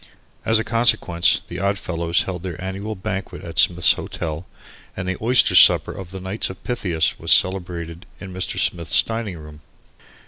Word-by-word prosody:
As 110 - +3
a 110 - 0
consequence 115 -8 +2
the 85 - -7
Oddfellows 90 -3 -1
held 90 -3 -6
their 90 -2 -7
annual 95 +3 -5
banquet 95 0 -6
at 85 -1 -4
Smith's 85 -4 +5
Hotel 80 +2 -6 0.5
and 95 -1 -4
the 95 - -2
Oyster 120 +3 +3
Supper - - +6
of 95 -3 -9
the 95 +1 -8
Knights 95 +4 -2
of 95 - -11
Pythias 90 -10 -1
was - - -3
celebrated 85 -2 0
in 95 -2 -9
Mr. 95 0 -4
Smith's 85 -2 +2
dining 115 -5 -5
room. 75 -1 -13
95 Hz, 165 wpm, -21 LUFS, 85-100 Hz, 0.5 s, Supper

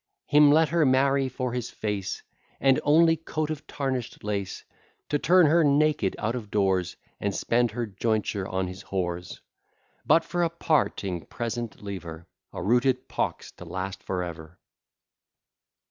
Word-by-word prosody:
Him 150 0 +6
let 160 +1 +4
her 170 -1 +3
marry 135 0 +3
for 125 -1 -3
his 125 -1 -3
face, 105 -3 -4 0.4
And 135 -1 +4
only 165 +2 +5
coat 155 -1 -3
of 155 -2 -6
tarnish'd 130 -4 -3
lace; 100 -2 -3 0.5
To 145 - +1
turn 180 +2 +5
her 165 +3 +4
naked 145 -7 +2
out 110 +2 -1
of 115 -4 -6
doors, 95 -3 +1 0.2
And 100 -2 -2
spend 120 +4 +1
her 120 +2 -3
jointure 105 -1 -1
on 95 0 -1
his 90 +2 -8
whores; 90 -2 -4 0.6
But, 165 - +4
for 175 +1 -2
a 170 - +2
parting 130 - -1
present, 120 -2 -5
leave 100 -3 -5
her 80 0 -9 0.3
A - - -6
rooted 125 +4 +2
pox - - -3
to - - -12
last 95 +1 -5
for 90 -1 -2
ever! 80 -1 -8
120 Hz, 155 wpm, -26 LUFS, 95-145 Hz, 0.6 s, Him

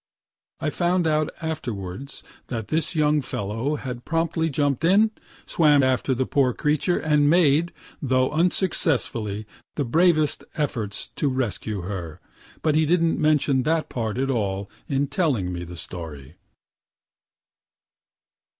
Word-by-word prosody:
(I 150 - -1
found 175 +1 +1
out 155 -1 +2
afterwards 130 - -5 0.2
that 115 -4 -4
this 160 +2 -1
young 150 -1 +3
fellow 115 +5 -2
had 125 -4 -6
promptly 165 0 0
jump'd 145 -1 0
in, 205 +6 +5 0.3
swam 150 -4 +4
after 130 0 +1
the 130 +1 0
poor 130 -2 +2
creature, 150 +6 +1
and 150 -2 +3
made, 165 0 +4 0.3
though 130 -2 +2
unsuccessfully, 145 - 0 0.3
the 145 - -1
bravest 155 +3 +3
efforts 115 -9 -3
to 145 - +1
rescue 110 -5 -2
her; 85 -4 -6 0.4
but 155 - +3
he 155 0 +3
didn't 165 0 +2
mention 150 -3 +3
that 160 +3 0
part 115 -2 -3
at 135 +1 0
all 100 -4 -2 0.2
in 140 0 +1
telling 135 - 0
me 90 0 -4
the 90 0 -9
story.) 80 -6 -7
140 Hz, 130 wpm, -24 LUFS, 115-155 Hz, 0.4 s, in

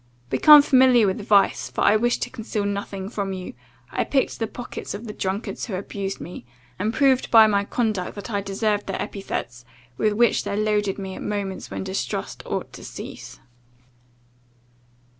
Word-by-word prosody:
Become 300 -2 +8
familiar 255 -5 +5
with 190 +2 -1
vice, 200 -1 +3
for - - -4
I 210 - +5
wish 240 +3 +2
to - - -3
conceal 215 -2 -3
nothing 200 -1 -4
from 200 -2 -3
you, 185 -1 -6 0.4
I - - 0
picked 270 -2 0
the 225 - -1
pockets 245 -3 -7
of 215 +4 -8
the 210 - -6
drunkards 195 +2 -3
who 205 - -3
abused 195 +1 -4
me; 175 -3 -8 0.4
and 210 +3 0
proved 265 0 +2
by 225 -1 +8
my 200 -2 +2
conduct, 215 -6 -1
that 205 +1 -7
I 200 -1 0
deserved 205 +1 -1
the - - -3
epithets, 125 - -5 0.4
with 215 -1 +2
which 235 +1 +3
they 200 - -3
loaded 210 -2 0
me 190 -1 -5
at - - -8
moments 200 -2 -4
when - - -4
distrust 190 0 -4
ought - - -4
to - - -10
cease. - - -9
205 Hz, 175 wpm, -23 LUFS, 195-225 Hz, 0.4 s, Become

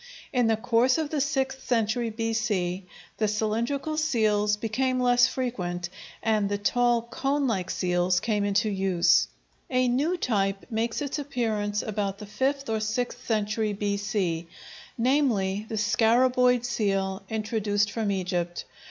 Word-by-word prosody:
In 245 -3 +3
the 225 -1 +2
course 240 +3 +3
of 315 -2 -2
the 300 -3 0
sixth 270 -2 -1
century 230 0 0
B.C. 215 -5 -1 0.3
the 215 - +1
cylindrical 230 +8 -1
seals 215 -9 +2
became 255 +4 0
less 245 0 +5
frequent, 180 -10 -3 0.3
and 215 -3 +1
the 205 - 0
tall 240 +3 +2
cone 275 +4 -1
like 190 -7 -1
seals 180 0 +1
came 210 0 0
into 205 +2 +1
use. 190 -3 +3 0.4
A 255 -1 +2
new 290 +9 +1
type 195 - 0
makes 230 +5 -1
its 285 +1 -3
appearance 220 -7 -1
about 200 -2 -2
the 210 - -8
fifth 275 +6 -1
or 220 -1 0
sixth 245 +3 -2
century 215 -1 0
B.C., 200 -4 -1 0.5
namely, 225 -6 +1
the 220 - -3
scaraboid 245 +3 +3
seal 195 -5 -1
introduced 210 -2 0
from 220 -3 -1
Egypt. 180 -2 -2
220 Hz, 135 wpm, -26 LUFS, 205-250 Hz, 0.5 s, less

